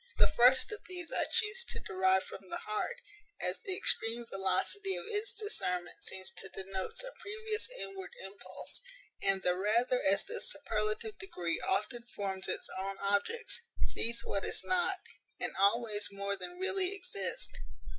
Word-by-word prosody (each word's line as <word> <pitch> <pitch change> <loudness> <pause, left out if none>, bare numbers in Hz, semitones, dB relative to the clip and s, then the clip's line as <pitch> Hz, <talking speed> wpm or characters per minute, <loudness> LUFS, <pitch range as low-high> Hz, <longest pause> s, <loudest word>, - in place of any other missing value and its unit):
The - - +7
first 250 - +5
of 420 - -3
these 360 -2 -3
I - - +3
chuse 450 +2 +2
to - - -2
derive 190 0 +2
from 190 - -10
the - - -2
heart, 215 0 -2 0.4
as - - -1
the 385 -5 -2
extreme 230 +1 +3
velocity 195 - +2
of - - -3
its 435 +1 -1
discernment 180 - -2
seems 190 0 0
to 195 - -5
denote 195 - -4
some - - -1
previous 435 +2 -2
inward 390 -3 -5
impulse, 195 +1 -3 0.4
and 195 -1 +3
the 180 0 +3
rather 235 +6 +2
as 195 +1 +4
this 465 +3 -3
superlative 225 - -1
degree 175 - -2
often 210 +5 0
forms 190 -2 -2
its - - -1
own 195 +1 -3
objects; 205 - 0 0.2
sees 235 +1 +5
what 200 - +1
is - - +1
not, 370 +1 +2 0.4
and - - -2
always 210 +1 +2
more 200 0 -1
than 355 - -5
really 380 +1 +3
exists. 400 +5 -2
230 Hz, 155 wpm, -33 LUFS, -, 0.4 s, The